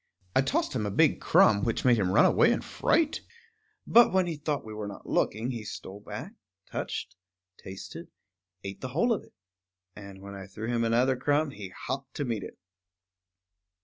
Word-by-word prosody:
I 130 Hz, -, +6 dB
tossed 135 Hz, -, 0 dB
him 110 Hz, -5 st, -1 dB
a -, -, -1 dB
big 100 Hz, -, +3 dB
crumb, 100 Hz, -2 st, +5 dB
which 115 Hz, -, -1 dB
made 120 Hz, -3 st, +5 dB
him 95 Hz, -3 st, +1 dB
run 95 Hz, -, +6 dB
away -, -, +5 dB
in -, -, 0 dB
fright; 315 Hz, -2 st, +1 dB, 0.6 s
but 235 Hz, +1 st, +6 dB
when 190 Hz, -1 st, +3 dB
he 170 Hz, -2 st, -3 dB
thought 145 Hz, -2 st, -3 dB
we 110 Hz, -, -8 dB
were 105 Hz, -1 st, -5 dB
not 100 Hz, -, -9 dB
looking 115 Hz, +5 st, 0 dB
he 115 Hz, -3 st, -5 dB
stole 100 Hz, -1 st, -8 dB
back, -, -, -8 dB, 0.3 s
touched, -, -, -5 dB, 0.4 s
tasted, 95 Hz, +1 st, -9 dB, 0.6 s
ate 100 Hz, 0 st, -7 dB
the 130 Hz, -, -3 dB
whole 235 Hz, +6 st, +4 dB
of 210 Hz, -, -3 dB
it. -, -, -22 dB, 0.6 s
And 100 Hz, -2 st, -10 dB
when 100 Hz, 0 st, -8 dB
I 95 Hz, 0 st, -8 dB
threw 105 Hz, +3 st, -6 dB
him 120 Hz, -1 st, +1 dB
another 120 Hz, +3 st, +3 dB
crumb, 145 Hz, +3 st, +1 dB
he 100 Hz, -6 st, -8 dB
hopped 135 Hz, +8 st, -6 dB
to 145 Hz, -, -2 dB
meet 115 Hz, -4 st, -2 dB
it. -, -, -9 dB
115 Hz, 185 wpm, -28 LUFS, 100-140 Hz, 0.6 s, I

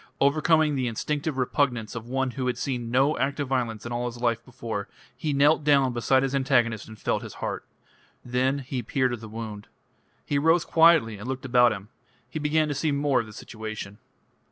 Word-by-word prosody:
Overcoming 155 Hz, +2 st, +3 dB
the 130 Hz, -3 st, 0 dB
instinctive 145 Hz, +5 st, -2 dB
repugnance 125 Hz, -3 st, 0 dB
of 115 Hz, 0 st, -7 dB
one 135 Hz, +1 st, -1 dB
who 130 Hz, 0 st, -3 dB
had 125 Hz, -1 st, -1 dB
seen 125 Hz, -3 st, -3 dB
no 135 Hz, +5 st, +2 dB
act 140 Hz, +1 st, -1 dB
of 145 Hz, -, -1 dB
violence 120 Hz, -5 st, -1 dB
in 120 Hz, -, -5 dB
all 120 Hz, +1 st, -1 dB
his 120 Hz, 0 st, -6 dB
life 115 Hz, -1 st, 0 dB
before, 115 Hz, -5 st, -5 dB, 0.3 s
he 150 Hz, +4 st, -2 dB
knelt 145 Hz, +2 st, +4 dB
down 140 Hz, -3 st, +4 dB
beside 130 Hz, +3 st, +2 dB
his 135 Hz, 0 st, -1 dB
antagonist 120 Hz, -5 st, +1 dB
and 110 Hz, 0 st, -11 dB
felt -, -, -1 dB
his -, -, -9 dB
heart. -, -, -4 dB, 0.6 s
Then 130 Hz, +3 st, +1 dB
he 130 Hz, -1 st, -3 dB
peered 130 Hz, 0 st, 0 dB
at 120 Hz, -, -4 dB
the 110 Hz, -1 st, -9 dB
wound. 110 Hz, -2 st, -7 dB, 0.6 s
He 145 Hz, -, 0 dB
rose 165 Hz, +3 st, +3 dB
quietly 160 Hz, -11 st, +4 dB
and 105 Hz, -, -7 dB
looked 130 Hz, 0 st, -4 dB
about 120 Hz, -1 st, +5 dB
him. 100 Hz, 0 st, -6 dB, 0.4 s
He 155 Hz, -, -5 dB
began 155 Hz, +1 st, +2 dB
to 145 Hz, -, -1 dB
see 150 Hz, +2 st, 0 dB
more 140 Hz, -1 st, +2 dB
of 115 Hz, -, -3 dB
the -, -, -11 dB
situation. 110 Hz, -2 st, -7 dB
130 Hz, 205 wpm, -26 LUFS, 115-140 Hz, 0.6 s, about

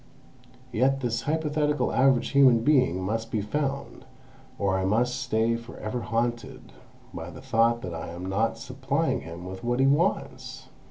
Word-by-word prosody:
Yet 135 Hz, +4 st, +2 dB
this 115 Hz, -2 st, -1 dB
hypothetical 150 Hz, -1 st, 0 dB
average 130 Hz, -2 st, +3 dB
human 130 Hz, -5 st, +5 dB
being 130 Hz, -, +3 dB
must 110 Hz, +3 st, -2 dB
be 110 Hz, -, -1 dB
found, 140 Hz, +5 st, -3 dB, 0.5 s
or 100 Hz, -2 st, +1 dB
I -, -, -1 dB
must 120 Hz, +6 st, +1 dB
stay 115 Hz, -2 st, +1 dB
for 115 Hz, +1 st, -9 dB
ever 110 Hz, +3 st, -4 dB
haunted 120 Hz, 0 st, -3 dB, 0.4 s
by -, -, -6 dB
the -, -, -10 dB
thought 115 Hz, +1 st, +1 dB
that 90 Hz, -, -5 dB
I 80 Hz, 0 st, -5 dB
am 85 Hz, +2 st, -7 dB
not 110 Hz, +4 st, 0 dB
supplying 135 Hz, +6 st, -1 dB
him 85 Hz, +2 st, -9 dB
with 95 Hz, +1 st, -8 dB
what 120 Hz, +1 st, 0 dB
he 135 Hz, -, +4 dB
wants!" 150 Hz, +8 st, 0 dB
120 Hz, 160 wpm, -26 LUFS, 110-135 Hz, 0.5 s, human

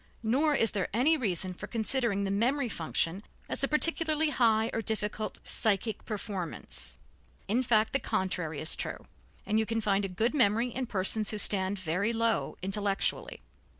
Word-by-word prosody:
Nor 285 Hz, +7 st, +2 dB
is 225 Hz, -4 st, +3 dB
there 195 Hz, -3 st, -1 dB
any 280 Hz, +8 st, +4 dB
reason 190 Hz, -, -1 dB
for -, -, -8 dB
considering 230 Hz, -3 st, 0 dB
the 195 Hz, -, -1 dB
memory 245 Hz, +6 st, +1 dB
function 165 Hz, 0 st, -1 dB, 0.3 s
as -, -, -1 dB
a -, -, +3 dB
particularly 315 Hz, 0 st, +2 dB
high 225 Hz, -3 st, +2 dB
or 225 Hz, -, -1 dB
difficult 215 Hz, 0 st, -2 dB
psychic 220 Hz, +1 st, -1 dB
performance; 185 Hz, -, -5 dB, 0.5 s
in 230 Hz, +5 st, +2 dB
fact, 220 Hz, -3 st, +2 dB
the 275 Hz, -, +2 dB
contrary 180 Hz, -, -2 dB
is 155 Hz, -, +3 dB
true, -, -, -5 dB, 0.4 s
and 215 Hz, +1 st, +1 dB
you 220 Hz, -, +1 dB
can 225 Hz, 0 st, -1 dB
find 200 Hz, -2 st, +1 dB
a -, -, 0 dB
good 220 Hz, +8 st, 0 dB
memory 235 Hz, -3 st, +3 dB
in 255 Hz, +1 st, -4 dB
persons 210 Hz, +1 st, 0 dB
who 215 Hz, -, -2 dB
stand 200 Hz, -1 st, +2 dB
very 190 Hz, +5 st, -1 dB
low 230 Hz, 0 st, 0 dB
intellectually. 195 Hz, +1 st, 0 dB
220 Hz, 165 wpm, -29 LUFS, 195-240 Hz, 0.5 s, any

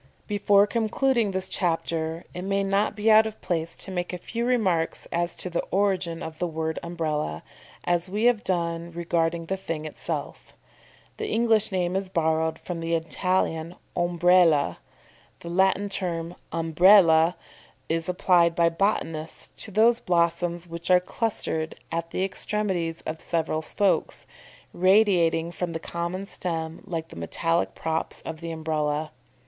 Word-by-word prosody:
Before 205 Hz, -1 st, +4 dB
concluding 230 Hz, +1 st, +1 dB
this 190 Hz, -1 st, 0 dB
chapter, 165 Hz, -2 st, -1 dB
it 180 Hz, -, -5 dB
may 195 Hz, +1 st, 0 dB
not 200 Hz, +2 st, +1 dB
be 215 Hz, +1 st, +3 dB
out 220 Hz, +1 st, +7 dB
of 220 Hz, -, -8 dB
place 170 Hz, -1 st, -2 dB
to 195 Hz, -, -3 dB
make 175 Hz, -1 st, -3 dB
a 180 Hz, -, -4 dB
few 230 Hz, +6 st, -4 dB
remarks 190 Hz, -10 st, +1 dB
as 170 Hz, +1 st, -1 dB
to -, -, -1 dB
the 175 Hz, -1 st, -1 dB
origin 185 Hz, -4 st, 0 dB
of 160 Hz, -1 st, -7 dB
the 175 Hz, -, 0 dB
word 160 Hz, -1 st, -3 dB
Umbrella, 155 Hz, -, -3 dB, 0.4 s
as 175 Hz, +1 st, 0 dB
we 210 Hz, +4 st, -2 dB
have 240 Hz, -3 st, +3 dB
done 170 Hz, -2 st, -1 dB
regarding 170 Hz, 0 st, -1 dB
the 190 Hz, +3 st, -2 dB
thing 165 Hz, -4 st, -5 dB
itself. 155 Hz, -, -5 dB, 0.6 s
The 435 Hz, -, -3 dB
English 225 Hz, -2 st, +2 dB
name 180 Hz, -1 st, 0 dB
is 195 Hz, -1 st, -2 dB
borrowed 160 Hz, -2 st, +1 dB
from 175 Hz, -2 st, -6 dB
the 165 Hz, 0 st, 0 dB
Italian 165 Hz, 0 st, -1 dB, 0.2 s
Ombrella. 175 Hz, -3 st, +3 dB, 0.6 s
The 170 Hz, -, -7 dB
Latin 190 Hz, +2 st, +2 dB
term 175 Hz, -3 st, -3 dB, 0.2 s
Umbella 165 Hz, 0 st, +5 dB, 0.5 s
is 165 Hz, +1 st, -1 dB
applied 175 Hz, -2 st, +3 dB
by 170 Hz, 0 st, +4 dB
botanists 165 Hz, -4 st, -2 dB, 0.2 s
to -, -, -9 dB
those 225 Hz, +4 st, +4 dB
blossoms 175 Hz, -1 st, 0 dB
which 170 Hz, +1 st, -6 dB
are 180 Hz, 0 st, +7 dB
clustered 180 Hz, -5 st, -2 dB, 0.2 s
at 165 Hz, 0 st, -2 dB
the 185 Hz, -, -1 dB
extremities 190 Hz, -4 st, -2 dB
of 160 Hz, +1 st, -5 dB
several 160 Hz, -2 st, -1 dB
spokes, 195 Hz, +4 st, +1 dB, 0.5 s
radiating 180 Hz, -4 st, +3 dB
from 175 Hz, -1 st, -4 dB
the 165 Hz, -, -3 dB
common 170 Hz, +3 st, -4 dB
stem 165 Hz, -4 st, -4 dB
like 165 Hz, -2 st, -4 dB
the -, -, -11 dB
metallic 165 Hz, -, -1 dB
props 160 Hz, 0 st, -3 dB
of 160 Hz, 0 st, -7 dB
the 165 Hz, -, -5 dB
Umbrella. 155 Hz, -1 st, -2 dB
175 Hz, 150 wpm, -26 LUFS, 165-195 Hz, 0.6 s, out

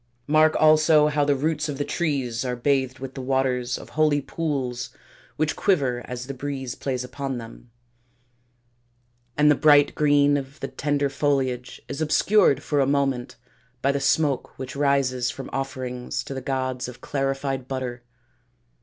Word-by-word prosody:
Mark 155 Hz, +2 st, +4 dB
also 155 Hz, -1 st, +5 dB
how 150 Hz, -1 st, +1 dB
the 145 Hz, 0 st, +2 dB
roots 150 Hz, +2 st, -1 dB
of 140 Hz, -, -4 dB
the 145 Hz, -, -2 dB
trees 135 Hz, -8 st, -1 dB
are 125 Hz, -1 st, -2 dB
bathed 130 Hz, +1 st, 0 dB
with 135 Hz, 0 st, -7 dB
the 135 Hz, -, -6 dB
waters 130 Hz, -2 st, 0 dB
of -, -, -11 dB
holy 155 Hz, -2 st, +2 dB
pools 135 Hz, -4 st, -3 dB, 0.5 s
which 155 Hz, +1 st, 0 dB
quiver 135 Hz, -11 st, +1 dB
as 125 Hz, 0 st, -6 dB
the 140 Hz, -, -5 dB
breeze 135 Hz, -2 st, -4 dB
plays 130 Hz, -2 st, -3 dB
upon 135 Hz, +1 st, -4 dB
them; 115 Hz, +1 st, -10 dB, 1.7 s
and 150 Hz, 0 st, +5 dB
the -, -, +7 dB
bright 145 Hz, 0 st, +5 dB
green 145 Hz, -1 st, +3 dB
of 140 Hz, +1 st, -7 dB
the -, -, -3 dB
tender 145 Hz, -1 st, -1 dB
foliage 135 Hz, -3 st, -1 dB
is 140 Hz, +2 st, -5 dB
obscured 155 Hz, -2 st, +3 dB
for 145 Hz, -, 0 dB
a 135 Hz, -, +3 dB
moment 135 Hz, -3 st, 0 dB, 0.5 s
by 140 Hz, -, +3 dB
the 140 Hz, -, -1 dB
smoke 140 Hz, 0 st, 0 dB
which 130 Hz, +1 st, -7 dB
rises 140 Hz, -3 st, +1 dB
from 135 Hz, -, -7 dB
offerings 130 Hz, -2 st, -4 dB
to -, -, -7 dB
the 130 Hz, -, -5 dB
gods 130 Hz, -1 st, -2 dB
of 125 Hz, -1 st, -10 dB
clarified 135 Hz, -1 st, -2 dB
butter. 130 Hz, -2 st, -4 dB
135 Hz, 160 wpm, -24 LUFS, 130-145 Hz, 1.7 s, the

